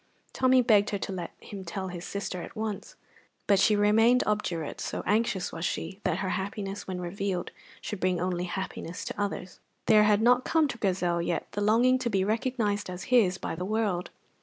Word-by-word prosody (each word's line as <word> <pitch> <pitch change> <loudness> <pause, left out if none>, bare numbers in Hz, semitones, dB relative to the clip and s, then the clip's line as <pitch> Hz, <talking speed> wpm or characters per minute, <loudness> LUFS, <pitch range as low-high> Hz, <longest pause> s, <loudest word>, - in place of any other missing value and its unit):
Tommy 255 -1 +4
begged 210 -3 +4
her 205 - -1
to 195 - -4
let 180 -3 -4
him 200 -2 -8
tell 190 +2 -4
his 175 -1 -7
sister 200 -3 -4
at - - -9
once; 215 -2 -4 0.5
but 200 -2 +4
she 210 +2 +4
remained 225 +4 +4
obdurate, 180 -7 -2
so - - -3
anxious 210 -2 +1
was 165 - -6
she 190 +2 -3
that 180 -3 0
her 190 -2 -2
happiness, 195 +1 -4
when 185 -1 -4
revealed, 180 +1 -3 0.3
should 210 - -5
bring 185 -1 +1
only 180 0 -1
happiness 180 -1 -5
to - - -4
others. 195 -2 -4 0.3
There 215 -2 +6
had 210 0 +3
not 250 +1 +5
come 320 -2 +2
to 235 - -6
Grizel 180 -4 +1
yet 170 -1 -1
the 205 - -3
longing 240 +5 +4
to 250 -2 -1
be 195 -4 +1
recognized 215 -2 -1
as 180 0 -6
his 190 -7 +5
by - - -4
the 170 +2 -4
world. 205 -3 -1
200 Hz, 195 wpm, -28 LUFS, 180-220 Hz, 0.5 s, There